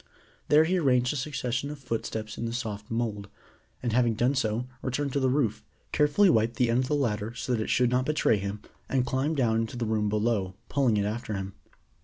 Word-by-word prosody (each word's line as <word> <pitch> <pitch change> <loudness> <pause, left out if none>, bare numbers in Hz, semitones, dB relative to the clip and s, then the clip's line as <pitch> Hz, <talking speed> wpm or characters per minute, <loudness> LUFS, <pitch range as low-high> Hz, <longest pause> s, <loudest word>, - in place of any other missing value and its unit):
There 150 +1 +6
he 180 +3 +1
arranged 125 -4 +2
a - - -5
succession 130 -1 -2
of 150 - -6
footsteps 110 -4 -4
in 115 - -4
the 115 - -4
soft 105 -4 -4
mould, 110 -3 -2 0.5
and 120 -3 -1
having 120 -2 +3
done 120 +5 +2
so, 115 -2 0 0.2
returned 135 +1 -2
to 140 - +1
the 130 -1 +2
roof, 125 -6 0 0.3
carefully 150 +7 +4
wiped 115 -6 +3
the 120 -2 +2
end 120 - +3
of 130 - 0
the 150 - +1
ladder, 115 -5 -1
so 125 - -2
that 115 - 0
it - - -3
should 125 -1 +3
not 125 +1 +1
betray 150 -7 +3
him, 100 +1 -4 0.3
and 130 -2 +1
climbed 135 +5 0
down 115 -4 +2
into 115 +2 -2
the 120 - -1
room 105 -1 0
below, 105 -3 0
pulling 130 -6 +2
it 100 - +1
after 110 0 -3
him. 95 0 -5
120 Hz, 220 wpm, -28 LUFS, 110-130 Hz, 0.5 s, There